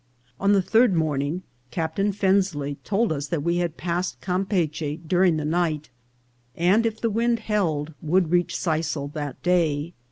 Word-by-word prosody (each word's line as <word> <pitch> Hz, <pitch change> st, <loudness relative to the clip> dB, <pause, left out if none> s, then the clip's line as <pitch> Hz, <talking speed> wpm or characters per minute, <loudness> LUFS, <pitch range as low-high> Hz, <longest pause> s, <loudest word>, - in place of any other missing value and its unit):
On 200 Hz, +1 st, +3 dB
the 195 Hz, -2 st, +3 dB
third 225 Hz, 0 st, +4 dB
morning 155 Hz, +2 st, -1 dB, 0.3 s
Captain 165 Hz, +9 st, -1 dB
Fensley 190 Hz, -8 st, +1 dB
told 210 Hz, -2 st, +1 dB
us 145 Hz, -1 st, -4 dB
we 170 Hz, +1 st, 0 dB
had 175 Hz, -2 st, -1 dB
passed 175 Hz, +1 st, -2 dB
Campeachy 175 Hz, -5 st, -1 dB
during 175 Hz, 0 st, +3 dB
the 150 Hz, -, -2 dB
night, 155 Hz, -3 st, -1 dB, 0.6 s
and, 195 Hz, +7 st, +3 dB
if 225 Hz, 0 st, -4 dB
the 230 Hz, -, 0 dB
wind 230 Hz, +1 st, +1 dB
held, 160 Hz, -9 st, -1 dB
would 170 Hz, +1 st, +1 dB
reach 175 Hz, 0 st, +2 dB
Sisal 155 Hz, -3 st, -2 dB
that 145 Hz, -4 st, -5 dB
day. 170 Hz, -3 st, +1 dB
175 Hz, 150 wpm, -24 LUFS, 155-195 Hz, 0.6 s, third